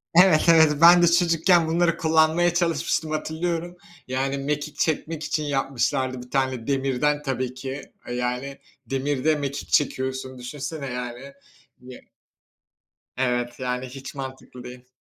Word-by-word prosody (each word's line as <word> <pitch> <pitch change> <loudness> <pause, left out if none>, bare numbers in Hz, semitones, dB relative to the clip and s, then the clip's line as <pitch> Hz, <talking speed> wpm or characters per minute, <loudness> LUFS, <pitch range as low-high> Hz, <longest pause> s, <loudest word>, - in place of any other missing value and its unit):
Evet, 180 -3 +6
evet, 160 -3 +6
ben 175 +1 +8
de 175 - +5
çocukken 170 0 +3
bunları 170 +1 +1
kullanmaya 160 +2 +3
çalışmıştım, 165 -2 0
hatırlıyorum. 170 +3 -3 0.3
Yani 135 +2 -1
mekik 145 +2 -3
çekmek 160 0 -1
için 155 - -1
yapmışlardı 135 -2 -1
bir 125 0 -14
tane, 130 -3 -1
demirden 140 +2 0
tabii 130 -2 -3
ki. 130 +2 -6 0.3
Yani, 125 +3 -3 0.3
demirde 140 +3 0
mekik 140 -1 -4
çekiyorsun 130 -2 -1
düşünsene, 140 +3 -6
yani. 125 +2 -6 0.5
Ye 125 0 -12 1.2
evet, 120 -1 -1
yani 125 0 -2
hiç 135 +1 -9
mantıklı 130 -2 -8
değil. 125 0 -11
140 Hz, 125 wpm, -24 LUFS, 130-160 Hz, 1.2 s, ben